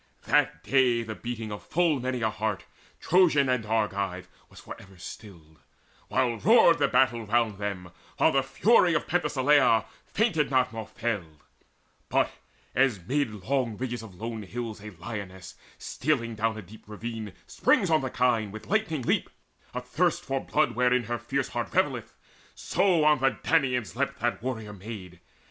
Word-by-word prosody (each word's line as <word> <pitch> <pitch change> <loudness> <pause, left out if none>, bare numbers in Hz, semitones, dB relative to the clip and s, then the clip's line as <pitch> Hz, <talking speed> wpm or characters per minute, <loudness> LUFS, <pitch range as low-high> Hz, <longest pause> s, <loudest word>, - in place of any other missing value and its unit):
That - - +1
day 125 -3 +3
the 110 -1 -5
beating 115 -1 -6
of 105 - -6
full 165 -4 +1
many 125 -1 -2
a 110 - +1
heart, 105 -2 -3 0.3
Trojan 160 -6 +4
and 125 -3 +1
Argive, 100 -4 -1 0.2
was - - -14
for - - -9
ever 95 -1 -16
stilled, 85 -5 -11 0.5
While 125 -3 +1
roared 190 -6 +5
the - - +3
battle 120 -3 +2
round 110 -2 +1
them, 95 -4 -4 0.3
while - - +4
the 135 - +3
fury 170 - +3
Of - - 0
Penthesileia 145 -7 +3 0.2
fainted 180 -10 +1
not 130 -2 +2
nor 110 -1 -6
failed; 100 -11 -4 0.7
But - - +2 0.4
as 130 -5 +3
amid 135 +10 -1
long 125 -3 -1
ridges 120 -2 -4
of 105 -5 -12
lone 115 +3 -5
hills 110 +1 -6
A 105 - -7
lioness, 95 -1 -8 0.2
stealing 125 -5 -1
down 110 0 -1
a 110 - -7
deep 105 +4 -15
ravine, 110 -1 -6
Springs - - +2
on 155 - +4
the 130 - -3
kine 120 -4 +1
with 110 +1 -9
lightning 195 - 0
leap, - - 0 0.5
athirst 140 +8 0
For 135 0 -1
blood 155 +1 +1
wherein 125 0 +2
her 120 +1 -3
fierce 135 +3 -2
heart - - -4
revelleth; - - 0 0.4
So 180 -3 +2
on 150 -2 +4
the 135 0 +1
Danaans 125 -5 +1
leapt 140 0 -2
that 120 0 -1
warrior 110 -4 -4
maid. 95 -3 -9
120 Hz, 160 wpm, -27 LUFS, 105-135 Hz, 0.7 s, roared